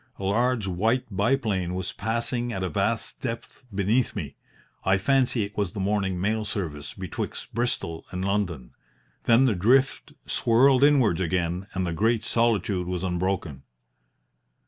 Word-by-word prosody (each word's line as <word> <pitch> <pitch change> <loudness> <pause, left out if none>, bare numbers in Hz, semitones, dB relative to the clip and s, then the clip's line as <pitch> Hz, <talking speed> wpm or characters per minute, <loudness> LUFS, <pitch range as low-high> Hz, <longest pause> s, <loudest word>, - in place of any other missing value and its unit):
A - - -8
large 115 +3 +1
white 110 +7 +1
biplane 100 -5 +1
was 95 -1 -3
passing 115 +3 -2
at 95 -4 -3
a 90 - -1
vast 75 - -1
depth 120 +4 -6
beneath 105 +5 +1
me. - - -4 0.5
I 95 +1 +3
fancy 125 +1 +2
it 100 0 -7
was 100 -4 -1
the - - -5
morning 95 -2 0
mail 110 +4 0
service 80 -9 -4
betwixt 95 -2 -5
Bristol 115 -9 -2
and 90 +1 -3
London. 90 -11 -1 0.5
Then 120 +3 +5
the 125 - +3
drift 125 +9 +2
swirled 130 +3 +4
inwards 130 - +4
again 90 +1 -1
and 95 -1 0
the 85 - -2
great 110 +5 +1
solitude 105 -6 +1
was 90 0 -3
unbroken. 90 -6 -2
100 Hz, 145 wpm, -26 LUFS, 90-120 Hz, 0.5 s, Then